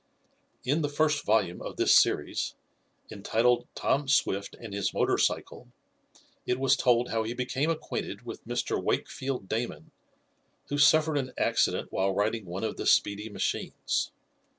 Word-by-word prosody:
In 145 +6 +1
the 145 - 0
first 150 0 +1
volume 105 -5 +1
of - - -6
this - - +5
series, - - +2 0.6
entitled 120 +4 +1
"Tom 140 0 0
Swift 100 -7 +1
and 110 -4 -9
His 100 -1 -2
Motor - - +2
Cycle," - - -1 0.8
it 125 - 0
was 135 0 +4
told 125 -2 +2
how 115 - +1
he 110 +2 -4
became 130 +4 -1
acquainted 165 -1 -4
with - - -8
Mr. - - -1
Wakefield 130 -7 -2
Damon, 110 -8 -4 0.8
who 145 - -1
suffered 155 +1 +5
an 130 -1 -5
accident - - +1
while 95 0 0
riding 110 0 -1
one 90 +4 -5
of 110 - -3
the - - -3
speedy 105 +2 +2
machines. 105 - -2
120 Hz, 150 wpm, -28 LUFS, 105-140 Hz, 0.8 s, this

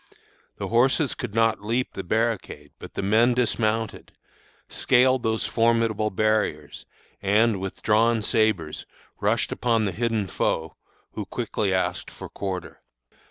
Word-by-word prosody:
The - - -4
horses 130 +5 +3
could 120 -5 -6
not 115 -2 +2
leap 120 +4 -1
the 95 - -5
barricade, 105 -8 -2
but - - -11
the - - -2
men 115 +5 +3
dismounted, 115 -2 -1 0.6
scaled 130 0 +3
those 110 -1 -1
formidable 115 -2 +1
barriers, 105 -8 -1 0.3
and, 105 +1 +3
with 95 0 -6
drawn 110 +1 +3
sabres, 105 -9 0 0.3
rushed - - +1
upon 115 -3 +1
the 100 - -1
hidden 115 +1 -1
foe, 80 -3 -2 0.4
who - - -5
quickly 100 -3 -2
asked 95 -1 -1
for - - -10
quarter. 95 -2 -5
110 Hz, 130 wpm, -25 LUFS, 100-115 Hz, 0.6 s, horses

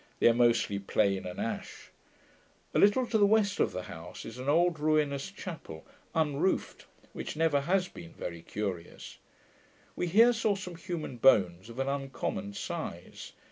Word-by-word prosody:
They - - +4
are 120 - +6
mostly 115 -4 +2
plane 100 -1 +1
and 90 - -7
ash. - - -5 0.8
A - - +2
little 210 +6 +5
to 230 -2 +1
the 205 - +6
west 205 -2 +2
of - - +2
the 90 - -5
house 80 -1 -9
is 115 +2 -8
an 130 +2 -2
old 170 +1 +3
ruinous 150 0 +1
chapel, 165 - -8 0.3
unroofed, 160 +3 0 0.3
which - - -5
never 155 -3 +2
has 185 +5 +1
been 170 -2 -11
very 85 - -6
curious. 95 -2 -6 0.8
We 180 - -1
here 225 +7 +6
saw 220 -3 +1
some 185 -2 -7
human 165 -6 -5
bones 95 -5 +4
of 115 - -10
an 135 0 -1
uncommon 140 +9 -3
size. 165 - -6
150 Hz, 160 wpm, -30 LUFS, 115-185 Hz, 0.8 s, are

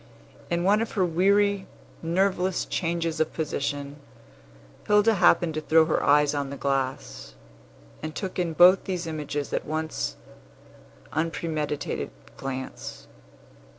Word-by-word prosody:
In 170 0 0
one 205 +4 +4
of 225 - -3
her 190 -4 +2
weary, 200 +3 +2 0.3
nerveless 185 +2 +1
changes 165 -2 -2
of 160 - 0
position, 145 -2 -3 0.9
Hilda 210 +2 +5
happened 175 -4 +4
to 155 - -3
throw 160 +1 +4
her 155 - 0
eyes 145 0 +4
on 140 -1 -2
the 140 - -6
glass, 135 - -3 0.7
and 155 0 -6
took 190 -2 -4
in 170 -2 0
both 180 +4 +6
these 180 -2 -3
images 150 -3 -4
at - - 0
one 155 +1 -3 1.2
unpremeditated 155 -2 -2 0.3
glance. 130 -1 -6
160 Hz, 120 wpm, -26 LUFS, 150-185 Hz, 1.2 s, both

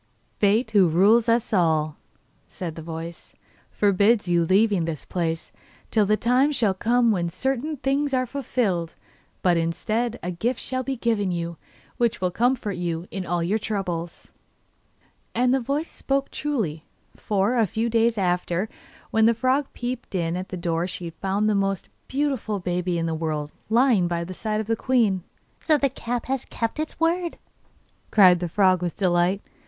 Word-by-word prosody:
'Fate, 215 +3 +2
who 200 -4 +5
rules 215 +8 +4
us 230 -1 +1
all,' 160 -5 +2 0.5
said 170 -3 -6
the 160 - -8
voice, 165 +1 -8 0.3
'forbids 205 +1 +3
your 175 -1 +3
leaving 195 -2 +3
this 160 -3 -5
place 165 -2 -2 0.4
till 215 -3 +3
the 215 +1 +3
time 255 +6 +3
shall 230 -9 +1
come 235 +4 +2
when 175 -4 0
certain 270 - -2
things 275 +2 0
are 255 -1 +1
fulfilled. 225 - -1 0.5
But, 175 -2 +4
instead, 215 +8 -1
a 180 - -2
gift 230 +8 -1
shall 255 -1 -2
be 270 +1 -3
given 225 -5 0
you, 170 -1 -3 0.4
which 235 -1 +1
will 180 -1 0
comfort 235 -2 0
you 170 -1 -3
in 190 -2 -4
all 175 0 0
your 200 +6 +1
troubles.' 180 -6 -4 1.0
And 250 +2 +3
the 265 - +3
voice 280 +6 -2
spoke 275 0 -1
truly, 215 - -2 0.3
for, 205 +3 0
a 225 -3 +3
few 225 +6 -1
days 230 0 +2
after, 180 +1 0 0.4
when 220 0 +4
the 230 - +4
frog 260 +4 +1
peeped 245 -4 -5
in 170 -1 0
at 185 +1 -5
the 185 - -5
door 170 0 -1
she 175 -2 -6
found 195 +5 -1
the 215 - +3
most 195 -2 -1 0.2
beautiful 265 -7 -1
baby 180 -1 -1
in 165 - -1
the 165 - -1
world 155 -2 -3 0.2
lying 230 -5 +4
by 170 -1 -1
the 185 +2 -7
side 215 +3 -2
of 220 - -2
the 225 +2 0
queen. 225 -6 +2 0.4
'So 310 -2 +3
the 275 -1 +1
cap 240 -2 -4
has 265 -1 -2
kept 230 +5 -3
its 310 0 -4
word,' 340 +1 0 0.7
cried 185 -4 +6
the 175 -1 -3
frog 185 0 +3
with 175 -2 -3
delight. 180 +1 +2
205 Hz, 170 wpm, -24 LUFS, 175-240 Hz, 1.0 s, cried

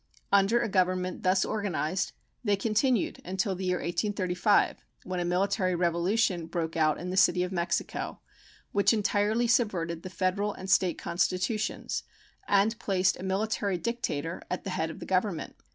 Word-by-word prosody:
Under 200 +4 +4
a - - 0
Government 185 -2 0
thus 185 +1 +3
organized 190 -4 -1 0.3
they 205 -3 +3
continued 220 +3 +1
until 190 +2 -1
the 185 0 -4
year 180 0 +1
1835, 180 +2 +1 0.2
when 185 0 -3
a - - 0
military 185 +1 +1
revolution 175 +1 +1
broke 165 -1 -3
out 155 -2 +2
in 180 +1 -5
the - - -2
City 180 -1 +4
of 180 - -3
Mexico 175 -2 -2 0.5
which 200 +3 +4
entirely 215 +2 +1
subverted 180 -9 +1
the 185 - -7
federal 185 +3 0
and 190 0 -5
State 185 -2 +3
constitutions 185 +5 -1 0.5
and 210 +3 +3
placed 190 -3 +2
a - - -7
military 195 0 0
dictator 170 -7 -3
at 180 - -3
the 195 - -4
head 160 -2 -1
of 160 - -8
the - - -5
Government. 185 -3 -1
185 Hz, 155 wpm, -29 LUFS, 180-205 Hz, 0.5 s, Under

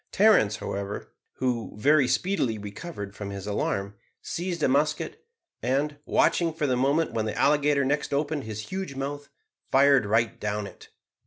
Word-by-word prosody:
Terence, 195 - +5
however, 100 -1 -5 0.2
who 125 -3 -2
very 140 +5 +4
speedily 155 - 0
recovered 105 - -7
from 100 -2 -6
his 100 -1 -6
alarm, 100 -1 -1 0.3
seized 175 -2 -4
a - - +5
musket, 145 - 0 0.3
and, 145 +3 0
watching 165 -2 +2
for 155 - -1
the 130 -3 +2
moment 140 +6 +2
when 110 -1 0
the 110 - -3
alligator 145 0 +3
next 145 +2 0
opened 145 -1 -1
his 110 0 -6
huge 190 -7 -4
mouth, 140 +1 -5 0.4
fired 135 -4 +5
right 115 +2 +1
down 105 0 -2
it. - - -12
135 Hz, 155 wpm, -26 LUFS, 110-150 Hz, 0.4 s, Terence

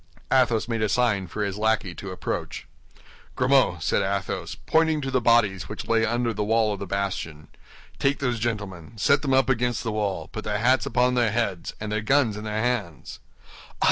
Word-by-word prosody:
Athos 120 -4 +3
made 115 -2 -2
a 110 - +1
sign 100 -5 +1
for 105 +5 -3
his 100 0 -3
lackey 110 -4 +1
to 100 - -8
approach. 95 - -4 0.7
"Grimaud," 125 -10 +3
said - - +1
Athos, 100 -1 -2
pointing 160 -1 +3
to 135 -1 -3
the 130 -1 +1
bodies 110 -6 +2
which 105 - -6
lay 115 -1 +2
under 120 0 0
the 105 0 -2
wall 110 0 +2
of 100 - -6
the 100 - -5
bastion, 90 -5 -4 0.5
"take 140 +1 +2
those 125 -4 -1
gentlemen, 105 -3 -4
set 140 +8 +3
them 135 -3 +1
up 135 -2 +3
against 125 -1 0
the 115 - -2
wall, 105 -3 -2
put 110 - -7
their 105 -1 -1
hats 130 +5 +2
upon 125 0 +2
their 120 -3 +2
heads, 105 -7 -2
and 110 0 -5
their 105 0 0
guns 125 -1 +2
in 105 +1 -7
their 110 +1 -2
hands." 105 - -3
110 Hz, 195 wpm, -25 LUFS, 100-125 Hz, 0.7 s, Athos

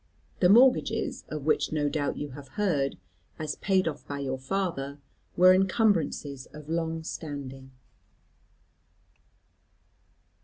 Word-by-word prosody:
The 180 - +5
mortgages, 250 +5 +4
of 150 -2 -5
which 155 - +2
no 150 -1 +1
doubt 145 0 -1
you 145 - -4
have 140 +1 -10
heard, 155 -10 +1 0.4
as 155 -2 -4
paid 190 -3 +2
off 150 - -5
by 145 - -4
your 130 -2 -3
father, 145 -3 -3 0.4
were 185 +1 +8
encumbrances 185 - +1
of 150 0 -12
long 165 -1 -2
standing. 140 -5 -7
155 Hz, 115 wpm, -28 LUFS, 140-185 Hz, 0.4 s, were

